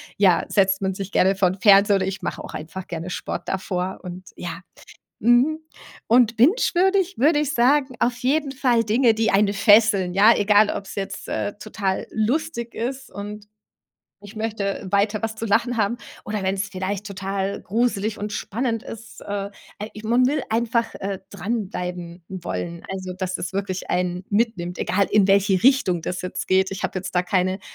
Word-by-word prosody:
ja, 185 -4 +3
setzt 195 -1 +2
man 190 0 0
sich 195 +1 -6
gerne 190 +1 +3
vor 190 -2 +3
'n 190 +2 -6
Fernseher 200 0 +6
oder 190 -1 -1
ich 195 0 -4
mache - - -4
auch - - -9
einfach 180 +4 -7
gerne 170 +1 -5
Sport - - -5
davor 185 -1 -3
und 180 0 -9
ja. 170 -1 -6 0.6
Mhm. 245 +7 +4 0.5
Und 235 -1 +4
bingewürdig 380 - +3
würde 295 +4 +4
ich 295 -1 -1
sagen, 265 +1 +2
auf 240 0 +1
jeden 275 +3 0
Fall 250 -4 +2
Dinge, 230 +3 +3
die 225 0 +1
einen 200 +1 +3
fesseln, 205 -3 +4
ja, 205 +4 +7
egal 205 +1 +4
ob's 195 - -6
jetzt, 195 0 -5
äh, 205 - -2
total 200 -2 -3
lustig 235 +2 -1
ist 260 +3 -4
und 205 +1 -8 0.7
ich 205 +1 -12
möchte 215 -3 -3
weiter 205 +2 +1
was 220 0 -3
zu 225 - -4
lachen 235 +3 +1
haben 220 +1 +1 0.3
oder 210 -1 -3
wenn's 190 +1 -1
vielleicht 190 +2 -3
total 195 0 -3
gruselig 220 0 -1
und 210 0 -4
spannend 230 +2 -2
ist. 230 +1 -10
Äh, - - -12 0.5
al 210 +2 -6
ich 215 - -10
man 240 +3 +3
will 285 +1 0
einfach, 230 +1 0
äh, 195 -1 -4
dranbleiben 180 -4 -4
wollen, 175 -2 -5
also, 185 -1 -5
dass 185 -1 -3
es 180 - -4
wirklich 190 -1 -3
einen 180 0 -1
mitnimmt, 200 -5 0
egal 200 0 +1
in 200 -2 +4
welche 195 -1 +3
Richtung 245 - +3
das 180 - -3
jetzt 180 - -5
geht. 190 +1 +3
Ich 195 - -6
habe - - -2
jetzt 185 - -7
da 180 - +3
keine, 185 +1 0
205 Hz, 175 wpm, -23 LUFS, 190-230 Hz, 0.7 s, ja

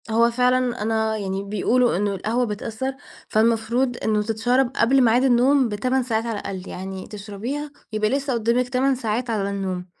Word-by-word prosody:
هو 230 +1 +3
فعلًا 250 0 +1
أنا 220 0 0
يعني 195 -1 -3
بيقولوا 215 +3 +1
إنّه 200 0 0
القهوة 230 +6 0
بتأثّر، 225 +5 -4 0.3
فالمفروض 230 +3 +1
إنّه 215 -1 +2
تتشَرب 240 +4 +1
قبل 265 +3 +4
ميعاد 240 +2 +4
النوم 260 +1 +4
ب8 255 +5 0
ساعات 225 -2 -1
على 225 -3 -3
الأقل، 195 -2 -6
يعني 190 0 -6
تشربيها 220 +8 -5 0.2
يبقى 215 0 +1
لسّه 275 +1 -1
قدّامك 235 +2 +1
8 265 +2 +2
ساعات 240 0 -2
على 205 -3 -1
النوم، 190 -2 -3
230 Hz, 160 wpm, -23 LUFS, 210-250 Hz, 0.3 s, قبل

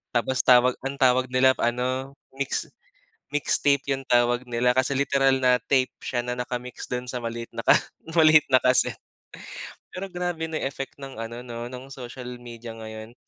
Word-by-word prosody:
tapos 125 +2 +1
tawag 125 0 +6 0.2
ang 140 - -5
tawag 130 0 +4
nila 130 +1 +4
ano 130 +3 -1 0.2
mix 135 0 -2 0.6
mix 145 +1 +1
tape 140 -1 +3
'yong 135 0 -4
tawag 120 0 +3
nila 120 +1 +2
kasi 130 +2 +1
literal 135 -1 +3
na 125 -1 +3
tape 130 +1 +1
siya 120 -1 -2
na 125 - -3
naka-mix 125 0 -5
dun 125 0 -3
sa 125 -1 -3
maliit 115 0 -5
na - - -5 0.6
maliit 155 -2 +7
na - - +9
casette, 125 0 +3 1.0
pero 195 +1 -5
grabe 175 -2 -3
na 160 - -3
effect 135 0 -5
ng 135 -2 -8
ano 115 +1 -6
no 120 0 -6
ng 130 +2 -9
social 125 -1 -8
media 120 -1 -9
ngayon. 110 +1 -9
125 Hz, 165 wpm, -25 LUFS, 120-135 Hz, 1.0 s, na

